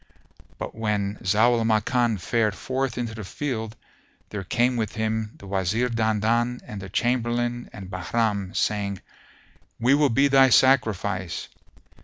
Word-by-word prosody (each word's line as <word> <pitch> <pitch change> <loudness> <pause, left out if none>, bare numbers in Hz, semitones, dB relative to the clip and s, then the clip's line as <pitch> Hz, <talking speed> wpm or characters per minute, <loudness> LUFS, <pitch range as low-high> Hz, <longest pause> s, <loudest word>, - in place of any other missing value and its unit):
But - - -6
when 105 -2 -1
Zau 110 +5 +3
al - - 0
Makan 115 +1 +2
fared 110 +2 0
forth 130 +4 -2
into 120 -2 -3
the 110 -1 -7
field, 110 - -4 0.5
there 100 -2 -5
came 120 +6 +1
with 110 -2 -2
him 110 -1 -2
the - - -13
Wazir 100 +5 0
Dandan 115 +2 +1
and 100 -2 -7
the 95 - -8
Chamberlain 120 +2 -1
and 100 -2 -9
Bahram, 100 +1 -1
saying, 100 -2 -1 0.8
"We 120 +4 +4
will 145 0 +4
be 135 +4 +3
thy 135 -1 +6
sacrifice." 105 -9 +2
110 Hz, 140 wpm, -25 LUFS, 100-120 Hz, 0.8 s, thy